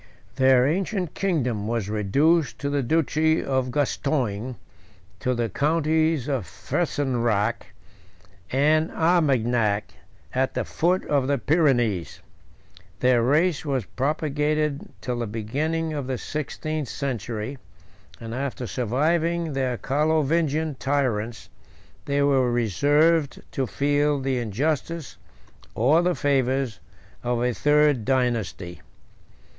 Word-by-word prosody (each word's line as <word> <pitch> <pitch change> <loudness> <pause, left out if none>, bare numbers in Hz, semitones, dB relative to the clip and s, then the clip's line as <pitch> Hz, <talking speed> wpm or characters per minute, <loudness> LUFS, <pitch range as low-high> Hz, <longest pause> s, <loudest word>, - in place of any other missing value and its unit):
Their 130 -1 +5
ancient 185 +2 -1
kingdom 125 - -1
was 115 -3 -1
reduced 135 - +2
to 140 0 -3
the 145 -1 +1
duchy 160 +3 +1
of 130 -2 0
Gascogne, 130 -4 -1 0.6
to 125 0 0
the 120 -1 0
counties 155 - +1
of 130 - -2
Fesenzac 120 - -1 0.8
and 155 +4 +3
Armagnac, 120 - +1 0.4
at 130 +1 0
the - - -1
foot 180 +3 0
of 140 -3 +1
the 140 0 +2
Pyrenees: 120 - +1 0.8
their 125 -2 +4
race 150 +7 +2
was 135 -7 -1
propagated 150 +2 -1
till 125 -2 -3
the 115 - -2
beginning 150 +10 -2
of 145 -4 -4
the 130 -1 -2
sixteenth 155 +1 -4
century; 125 -1 -4 0.6
and 115 0 -7
after 130 -1 -3
surviving 160 +8 0
their 130 -3 -1
Carlovingian 155 +1 +1
tyrants, 120 -5 -1 0.6
they 140 0 +1
were 135 -3 +3
reserved 145 - +2
to 135 -2 -1
feel 145 +2 +1
the 135 -1 -1
injustice, 145 - -2 0.6
or 140 +9 +4
the 180 0 +1
favors, 130 -5 0 0.4
of 120 0 0
a 125 0 +1
third 150 -2 +3
dynasty. 115 -8 -1
135 Hz, 110 wpm, -24 LUFS, 120-155 Hz, 0.8 s, Their